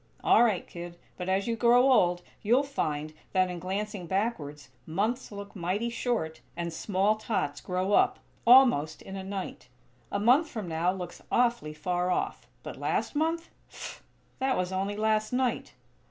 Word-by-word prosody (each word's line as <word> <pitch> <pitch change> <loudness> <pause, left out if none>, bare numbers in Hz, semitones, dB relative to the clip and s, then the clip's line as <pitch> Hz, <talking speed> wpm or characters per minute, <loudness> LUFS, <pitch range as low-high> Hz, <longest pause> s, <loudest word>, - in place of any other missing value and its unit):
"All - - +6
right, 215 -6 +1
kid; 175 0 -8 0.2
but 180 0 -4
as 190 +1 +1
you 230 - 0
grow 245 +3 +5
old, 175 -7 +3 0.2
you'll 240 +6 +3
find 155 - -2 0.2
that, 185 -1 +3
in 175 - -5
glancing 195 +1 -4
backwards, 160 - -2 0.2
months 215 +11 -1
look 200 0 -8
mighty 195 +6 -1
short; 230 -10 -2 0.2
and 170 -1 -3
small 200 +5 +1
tots 150 -10 -2
grow 185 +2 -1
up, - - +4 0.3
almost 235 - +6
in 195 - -8
a 190 - -5
night. 190 -7 -6 0.4
A - - 0
month 255 +9 +4
from 215 -5 -5
now 165 +2 +1
looks 180 -2 -7
awfully 235 -11 +1
far 180 +3 -1
off; 180 - -2 0.2
but - - -7
last - - -1
month? 330 +2 0 0.2
Pff! - - -8 0.4
That 265 0 +1
was 180 0 -1
only 195 +2 -1
last 215 0 +1
night!" 250 -1 -1
195 Hz, 165 wpm, -29 LUFS, 175-235 Hz, 0.4 s, All